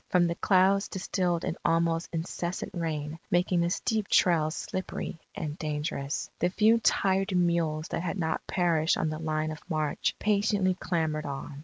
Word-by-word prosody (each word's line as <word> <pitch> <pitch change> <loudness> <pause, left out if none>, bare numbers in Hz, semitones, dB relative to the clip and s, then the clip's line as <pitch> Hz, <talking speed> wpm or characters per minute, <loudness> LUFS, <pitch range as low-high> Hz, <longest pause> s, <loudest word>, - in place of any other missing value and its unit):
From 180 -1 +4
the 170 - 0
clouds 190 +2 +3
distilled 180 -3 -1
an - - -2
almost 165 0 +1
incessant 170 +1 -3
rain, 160 -2 -3
making 175 0 +2
the 170 - +1
steep 215 +2 -1
trails 160 -3 +3
slippery 185 -3 -4 0.2
and 155 -6 -4
dangerous. 150 -2 -2
The 175 - +2
few 220 +5 +4
tired 195 -3 +2
mules 170 -3 +1
that - - -2
had 180 +2 -3
not 160 -3 -2
perished 170 -3 +2
on 160 - 0
the 155 - -4
line 155 -1 -1
of 155 - -8
march, 155 -3 0
patiently 205 -2 +2
clambered 160 -4 -1
on. 140 0 -6
170 Hz, 160 wpm, -28 LUFS, 155-185 Hz, 0.2 s, From